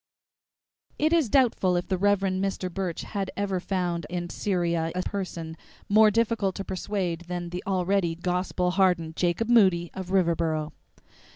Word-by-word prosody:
II -, -, +2 dB
It 315 Hz, -, +3 dB
is 320 Hz, -9 st, +3 dB
doubtful 220 Hz, -8 st, +3 dB
if 175 Hz, -, -1 dB
the 190 Hz, -, 0 dB
Rev. 205 Hz, 0 st, +3 dB
Mr. 190 Hz, -1 st, -2 dB
Burch 185 Hz, -3 st, -3 dB
had 195 Hz, -2 st, -3 dB
ever 195 Hz, -2 st, -1 dB
found 175 Hz, -3 st, -2 dB
in 175 Hz, 0 st, -4 dB
Syria 170 Hz, -4 st, -1 dB
a 185 Hz, -, -1 dB
person 170 Hz, -5 st, -5 dB, 0.3 s
more 215 Hz, +1 st, +6 dB
difficult 215 Hz, -3 st, +1 dB
to 195 Hz, -, -4 dB
persuade 185 Hz, -3 st, -3 dB
than 175 Hz, -1 st, -4 dB
the 180 Hz, +1 st, -5 dB
already 185 Hz, -2 st, +1 dB
"gospel 180 Hz, +1 st, -1 dB
hardened" 180 Hz, -4 st, +2 dB
Jacob 175 Hz, +6 st, 0 dB
Moody 190 Hz, -8 st, +4 dB
of 190 Hz, -1 st, -6 dB
Riverboro. 165 Hz, -4 st, +1 dB
185 Hz, 155 wpm, -26 LUFS, 175-200 Hz, 0.3 s, more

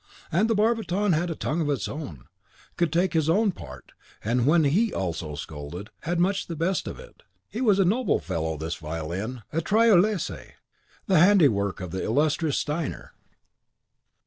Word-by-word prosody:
And 195 Hz, +8 st, +2 dB
the 225 Hz, -, +2 dB
barbiton 210 Hz, -3 st, +1 dB
had 170 Hz, +3 st, 0 dB
a 165 Hz, -, -3 dB
tongue 160 Hz, +3 st, -2 dB
of 155 Hz, -, -1 dB
his 145 Hz, -2 st, -1 dB
own, 90 Hz, -, -7 dB, 0.5 s
could 170 Hz, -3 st, 0 dB
take 175 Hz, +2 st, +1 dB
his 160 Hz, -1 st, +1 dB
own 205 Hz, +4 st, +3 dB
part, 65 Hz, -, -11 dB, 0.3 s
and 120 Hz, +3 st, +1 dB
when 160 Hz, +1 st, +5 dB
HE 195 Hz, +11 st, +2 dB
also 85 Hz, -4 st, -3 dB
scolded, 75 Hz, +7 st, -8 dB
had 170 Hz, +2 st, -2 dB
much 195 Hz, +3 st, +1 dB
the 170 Hz, -, -5 dB
best 170 Hz, +4 st, -1 dB
of -, -, -6 dB
it. -, -, -14 dB, 0.3 s
He 230 Hz, -, -5 dB
was 210 Hz, -6 st, +4 dB
a 195 Hz, -, +4 dB
noble 220 Hz, +5 st, +2 dB
fellow, 80 Hz, -3 st, -3 dB
this 80 Hz, +2 st, -4 dB
Violin! 85 Hz, +10 st, -5 dB
a 165 Hz, -, +1 dB
Tyrolese, 210 Hz, -1 st, +2 dB, 0.5 s
the 185 Hz, -5 st, +4 dB
handiwork 140 Hz, -, +4 dB
of 90 Hz, -3 st, -6 dB
the 95 Hz, -, -3 dB
illustrious 150 Hz, +4 st, +1 dB
Steiner. 150 Hz, 0 st, -3 dB
160 Hz, 170 wpm, -26 LUFS, -, 0.5 s, when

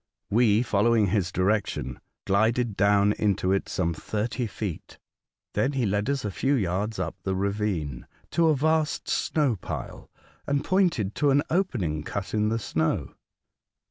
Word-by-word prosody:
We, 110 Hz, 0 st, +4 dB
fol 105 Hz, -3 st, +1 dB
lowing 115 Hz, -4 st, +4 dB
his 95 Hz, -5 st, +1 dB
direction, 95 Hz, -, -1 dB, 0.3 s
glided 110 Hz, +3 st, +2 dB
down 100 Hz, +1 st, +4 dB
into 100 Hz, -3 st, +1 dB
it 95 Hz, -, 0 dB
some 85 Hz, -2 st, 0 dB
thirty 110 Hz, -, -3 dB
feet. 100 Hz, -5 st, -6 dB, 0.6 s
Then 135 Hz, +2 st, +1 dB
he 130 Hz, -3 st, 0 dB
led 105 Hz, +4 st, 0 dB
us 140 Hz, -4 st, -1 dB
a 105 Hz, -, -2 dB
few 135 Hz, +8 st, +1 dB
yards 105 Hz, 0 st, -1 dB
up -, -, -2 dB
the 95 Hz, -1 st, -2 dB
ravine, 95 Hz, -, -2 dB, 0.2 s
to 170 Hz, -1 st, +3 dB
a 155 Hz, -, +4 dB
vast 155 Hz, +2 st, +1 dB
snow 140 Hz, -8 st, +1 dB
pile, -, -, -7 dB, 0.4 s
and 140 Hz, 0 st, +1 dB
pointed 175 Hz, -, +1 dB
to 145 Hz, -, +3 dB
an 140 Hz, +1 st, +4 dB
opening 120 Hz, -, 0 dB
cut 100 Hz, +5 st, -5 dB
in 105 Hz, 0 st, +2 dB
the 115 Hz, -, 0 dB
snow. 80 Hz, -7 st, -1 dB
105 Hz, 155 wpm, -26 LUFS, 95-130 Hz, 0.6 s, We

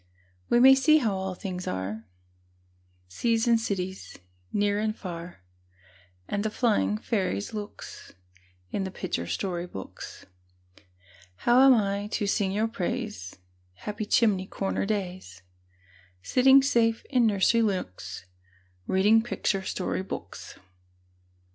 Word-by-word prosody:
We 240 Hz, -, +4 dB
may 265 Hz, +2 st, +9 dB
see 305 Hz, +4 st, +5 dB
how 230 Hz, -9 st, +1 dB
all 190 Hz, -1 st, -3 dB
things 185 Hz, -1 st, -6 dB
are, 100 Hz, +4 st, -4 dB, 1.0 s
Seas 230 Hz, -, 0 dB
and 230 Hz, -1 st, +4 dB
cities, 190 Hz, -4 st, -4 dB, 0.3 s
near 205 Hz, 0 st, +1 dB
and 215 Hz, 0 st, -1 dB
far, 170 Hz, -, -8 dB, 0.8 s
And 205 Hz, 0 st, -2 dB
the 220 Hz, -, 0 dB
flying 215 Hz, -2 st, +1 dB
fairies' 190 Hz, -, -2 dB
looks, 210 Hz, -1 st, -8 dB, 0.6 s
In 195 Hz, -, -1 dB
the 190 Hz, -, -3 dB
picture 85 Hz, -, -4 dB
story 180 Hz, -, -3 dB
books. 95 Hz, -, -9 dB, 1.2 s
How 245 Hz, +2 st, +6 dB
am 265 Hz, -, +8 dB
I 200 Hz, -1 st, 0 dB
to 210 Hz, -, 0 dB
sing 200 Hz, -1 st, 0 dB
your 215 Hz, +3 st, +1 dB
praise, 210 Hz, -, -4 dB, 0.4 s
Happy 210 Hz, -, -5 dB
chimney 200 Hz, -6 st, +2 dB
corner 195 Hz, 0 st, -2 dB
days, 185 Hz, -, -4 dB, 0.8 s
Sitting 265 Hz, -, +5 dB
safe 230 Hz, -4 st, +2 dB
in 245 Hz, -4 st, +4 dB
nursery 215 Hz, +3 st, +3 dB
nooks, 95 Hz, -, -3 dB, 0.6 s
Reading 210 Hz, +4 st, +4 dB
picture 215 Hz, -4 st, -1 dB
story 190 Hz, -1 st, -2 dB
books? 190 Hz, -, -8 dB
205 Hz, 120 wpm, -27 LUFS, 185-225 Hz, 1.2 s, may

